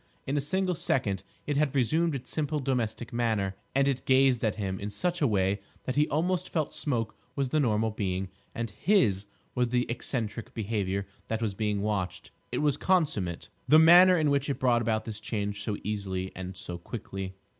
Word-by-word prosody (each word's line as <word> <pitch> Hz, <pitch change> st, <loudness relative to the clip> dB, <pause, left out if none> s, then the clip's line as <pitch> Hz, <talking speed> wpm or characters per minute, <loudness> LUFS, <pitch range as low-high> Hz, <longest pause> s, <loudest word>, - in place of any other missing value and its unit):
In 135 Hz, -, -1 dB
a 145 Hz, -, +2 dB
single 185 Hz, +5 st, +1 dB
second 120 Hz, -, 0 dB, 0.2 s
it 145 Hz, -1 st, -1 dB
had 145 Hz, -2 st, +1 dB
resumed 155 Hz, +5 st, +2 dB
its 125 Hz, -2 st, -6 dB
simple, 150 Hz, -1 st, -1 dB
domestic 120 Hz, -4 st, -2 dB
manner; 110 Hz, -5 st, 0 dB, 0.2 s
and 135 Hz, 0 st, +4 dB
it 135 Hz, -2 st, 0 dB
gazed 130 Hz, -2 st, +4 dB
at 110 Hz, -3 st, +1 dB
him 95 Hz, -3 st, -3 dB
in 100 Hz, -, -4 dB
such 175 Hz, -, -1 dB
a 145 Hz, -, +4 dB
way 100 Hz, -2 st, +1 dB, 0.2 s
that 130 Hz, -, -3 dB
he 150 Hz, +1 st, +3 dB
almost 175 Hz, +4 st, 0 dB
felt 155 Hz, -3 st, -1 dB
Smoke 115 Hz, -7 st, -2 dB, 0.2 s
was 140 Hz, -2 st, 0 dB
the 155 Hz, -, +2 dB
normal 110 Hz, -4 st, +2 dB
being, 95 Hz, -3 st, -2 dB, 0.3 s
and 115 Hz, -2 st, -3 dB
his 105 Hz, -, +2 dB, 0.3 s
was 125 Hz, -1 st, +1 dB
the 125 Hz, +1 st, +1 dB
eccentric 120 Hz, -2 st, -4 dB
behaviour 100 Hz, -3 st, -1 dB, 0.2 s
that 110 Hz, -, -1 dB
was 110 Hz, -3 st, -1 dB
being 105 Hz, 0 st, -1 dB
watched. 100 Hz, -4 st, -2 dB, 0.2 s
It -, -, -1 dB
was 145 Hz, -2 st, +2 dB
consummate, 145 Hz, -, 0 dB, 0.2 s
the 155 Hz, -, +7 dB
manner 175 Hz, +3 st, +8 dB
in 155 Hz, -3 st, +2 dB
which 140 Hz, 0 st, +1 dB
it 140 Hz, -, -1 dB
brought 120 Hz, -2 st, +3 dB
about 110 Hz, -1 st, 0 dB
this 110 Hz, -3 st, -6 dB
change 105 Hz, -2 st, -3 dB
so 105 Hz, -1 st, -2 dB
easily 95 Hz, -3 st, -3 dB
and 95 Hz, 0 st, -6 dB
so 90 Hz, -1 st, -6 dB
quickly. 95 Hz, -1 st, -6 dB
115 Hz, 190 wpm, -29 LUFS, 100-145 Hz, 0.3 s, manner